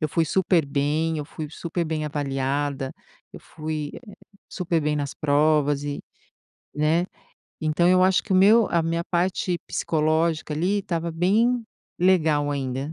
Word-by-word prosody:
Eu 155 Hz, -, 0 dB
fui 165 Hz, +2 st, +1 dB
super 175 Hz, +1 st, +2 dB
bem, 150 Hz, +3 st, 0 dB
eu 150 Hz, -, -4 dB
fui 155 Hz, 0 st, -7 dB
super 170 Hz, +1 st, -3 dB
bem 155 Hz, -1 st, -2 dB
avaliada, 140 Hz, -1 st, -2 dB, 0.4 s
eu, -, -, -9 dB
eh, -, -, -27 dB
fui 155 Hz, -2 st, -5 dB, 0.6 s
super 170 Hz, -3 st, -1 dB
bem 150 Hz, 0 st, 0 dB
nas 145 Hz, +1 st, -3 dB
provas 145 Hz, -1 st, +2 dB
e, 145 Hz, -1 st, -4 dB, 0.8 s
né. 155 Hz, +4 st, +2 dB, 0.6 s
Então, 155 Hz, +3 st, +2 dB
eu 185 Hz, 0 st, +5 dB
acho 185 Hz, 0 st, +3 dB
que 200 Hz, -, -4 dB
o -, -, +4 dB
meu 210 Hz, +4 st, +6 dB
a 170 Hz, -1 st, +2 dB
minha 165 Hz, +1 st, -1 dB
parte 175 Hz, 0 st, -1 dB
psicológica 160 Hz, 0 st, 0 dB
ali 180 Hz, +7 st, 0 dB
estava 170 Hz, -3 st, -3 dB
bem 220 Hz, +9 st, +2 dB, 0.4 s
legal 160 Hz, -5 st, +3 dB
ainda, 135 Hz, +1 st, -3 dB
160 Hz, 155 wpm, -24 LUFS, 145-175 Hz, 0.8 s, meu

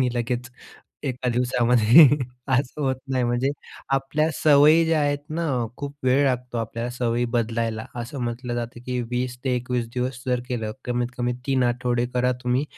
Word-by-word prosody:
आणि 130 Hz, -, +3 dB
लगेच 120 Hz, 0 st, -2 dB, 0.6 s
1 125 Hz, 0 st, -2 dB
दिवसामध्ये 125 Hz, +3 st, +5 dB, 0.5 s
असं 130 Hz, +3 st, 0 dB
होत 130 Hz, -1 st, +1 dB
नाही. 130 Hz, -2 st, +1 dB
म्हणजे 120 Hz, +3 st, +1 dB, 0.4 s
आपल्या 150 Hz, +3 st, 0 dB
सवयी 155 Hz, +2 st, +5 dB
ज्या 160 Hz, -1 st, +2 dB
आहेत 145 Hz, -1 st, +1 dB
ना, 165 Hz, +2 st, -2 dB, 0.3 s
खूप 145 Hz, 0 st, -6 dB
वेळ 130 Hz, +2 st, +4 dB
लागतो 125 Hz, -2 st, -1 dB
आपल्याला 115 Hz, +2 st, -3 dB
सवयी 120 Hz, -1 st, 0 dB
बदलायला, 115 Hz, -1 st, -1 dB, 0.2 s
असं 130 Hz, +4 st, -6 dB
म्हटलं 120 Hz, +1 st, -3 dB
जातं, 120 Hz, 0 st, -5 dB
की 125 Hz, -1 st, -1 dB
20-21 125 Hz, -1 st, -2 dB
दिवस 125 Hz, 0 st, -3 dB
जर 125 Hz, -1 st, +1 dB
केलं, 110 Hz, -4 st, -3 dB
कमीत-कमी 125 Hz, 0 st, -1 dB
3 135 Hz, -2 st, +2 dB
आठवडे 120 Hz, 0 st, 0 dB
करा 125 Hz, 0 st, +2 dB
तुम्ही 125 Hz, +3 st, +1 dB
125 Hz, 150 wpm, -24 LUFS, 120-130 Hz, 0.6 s, दिवसामध्ये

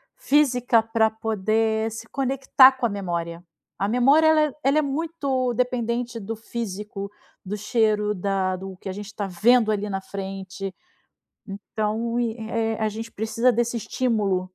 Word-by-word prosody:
física 250 Hz, -5 st, +3 dB
pra 225 Hz, 0 st, +2 dB
poder 220 Hz, +1 st, 0 dB
se 225 Hz, +1 st, -8 dB
conectar 270 Hz, 0 st, +5 dB
com 255 Hz, -2 st, -2 dB
a -, -, +2 dB
memória. 170 Hz, -3 st, -4 dB, 0.3 s
A 200 Hz, -, 0 dB
memória, 275 Hz, +7 st, +4 dB
ela 315 Hz, -1 st, +5 dB
é 300 Hz, -3 st, +1 dB
ela 275 Hz, +3 st, +3 dB
é -, -, +3 dB
muito 280 Hz, -4 st, -1 dB
dependente 240 Hz, -1 st, -1 dB
do 220 Hz, +2 st, -5 dB
físico, 210 Hz, -3 st, -6 dB, 0.4 s
do 205 Hz, +3 st, -3 dB
cheiro, 210 Hz, 0 st, +1 dB
da 190 Hz, -1 st, -1 dB
do 190 Hz, 0 st, -8 dB
que 190 Hz, -, -7 dB
a -, -, -2 dB
gente 205 Hz, +1 st, -8 dB
tá 205 Hz, -, -2 dB
vendo 220 Hz, +5 st, +3 dB
ali 210 Hz, 0 st, -2 dB
na 195 Hz, -1 st, -3 dB
frente. 195 Hz, 0 st, -6 dB, 1.0 s
Então, 225 Hz, +2 st, -1 dB
i 235 Hz, -1 st, -1 dB
eh 225 Hz, -1 st, 0 dB
eh, -, -, -8 dB
a 220 Hz, -, +1 dB
gente 225 Hz, +2 st, -7 dB
precisa 225 Hz, +4 st, +1 dB
desse 235 Hz, +1 st, 0 dB
estímulo. 205 Hz, -6 st, 0 dB
220 Hz, 160 wpm, -24 LUFS, 200-245 Hz, 1.0 s, conectar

